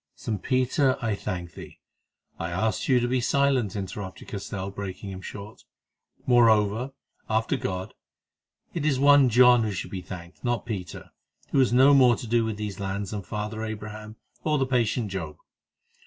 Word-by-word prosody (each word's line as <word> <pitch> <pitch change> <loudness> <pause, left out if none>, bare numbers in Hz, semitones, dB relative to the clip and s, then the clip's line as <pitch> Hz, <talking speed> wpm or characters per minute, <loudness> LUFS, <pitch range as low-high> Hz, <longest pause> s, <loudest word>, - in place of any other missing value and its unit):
"Saint 105 -5 -4
Peter, 130 +1 +2
I 115 -4 -1
thank 90 -3 -5
thee—" - - -11 0.6
"I 85 - -3
asked 95 +6 -1
you 130 -2 +5
to 120 - 0
be 125 0 +1
silent," 130 -5 +1
interrupted 95 -1 -6
Castell, 100 -1 -5
breaking 100 0 -6
him 95 0 -8
short. 100 +3 -9 0.6
"Moreover, 115 0 +3 0.4
after 110 +1 +1
God, 95 0 -4 0.8
it 165 - -3
is 145 -4 +1
one 140 -1 +6
John 125 +1 +6
who 110 -2 -1
should 90 -1 -5
be 95 - -4
thanked, 90 -1 -10
not 120 -2 0
St. - - -30
Peter, 95 -7 -6 0.4
who 140 - +3
has 130 -3 +4
no 130 +4 +6
more 125 -3 +6
to - - -7
do 115 +1 +2
with 110 -2 -3
these 105 -2 -5
lands 100 0 -3
than 105 -1 -3
Father 105 +3 -5
Abraham 110 0 -7 0.3
or 155 -1 +1
the 135 - +1
patient 120 -4 0
Job. 80 -6 -5
110 Hz, 170 wpm, -26 LUFS, 100-125 Hz, 0.8 s, one